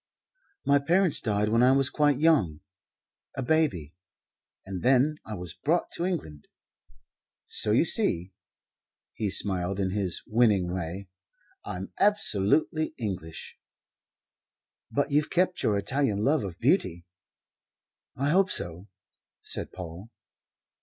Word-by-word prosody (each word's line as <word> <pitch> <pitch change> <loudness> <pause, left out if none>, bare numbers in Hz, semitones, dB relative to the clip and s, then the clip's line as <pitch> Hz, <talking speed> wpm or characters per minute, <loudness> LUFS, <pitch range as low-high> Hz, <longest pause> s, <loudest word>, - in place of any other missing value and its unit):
"My 140 0 +4
parents 175 +3 +3
died 105 -2 0
when 115 +2 +3
I 130 +1 +5
was 135 -1 +3
quite 145 -3 +2
young 140 - +2 0.7
a 135 - -3
baby 120 - 0 0.7
and 95 -2 -6
then 135 +4 +3
I 110 - -5
was 90 -2 -7
brought 170 +4 -1
to 170 - -2
England. 80 - -5 1.0
So - - -2
you - - +4
see" 90 +3 +2 0.8
he 105 -3 -2
smiled 95 0 -1
in 95 -1 0
his 95 -4 +1
winning 105 -6 +2
way 95 +2 -5 0.6
"I'm 90 +1 -7
absolutely 155 - +1
English." 90 -8 -6 1.3
"But 140 +1 -1
you've 150 +1 +2
kept 180 +1 +1
your 105 - +1
Italian 105 -1 0
love 145 +1 +2
of 95 -4 -6
beauty." 85 +1 +1 1.1
"I 140 +3 -1
hope 190 +4 +3
so," 85 +3 -2 0.6
said - - -3
Paul. 90 +3 -9
110 Hz, 120 wpm, -27 LUFS, 90-145 Hz, 1.3 s, I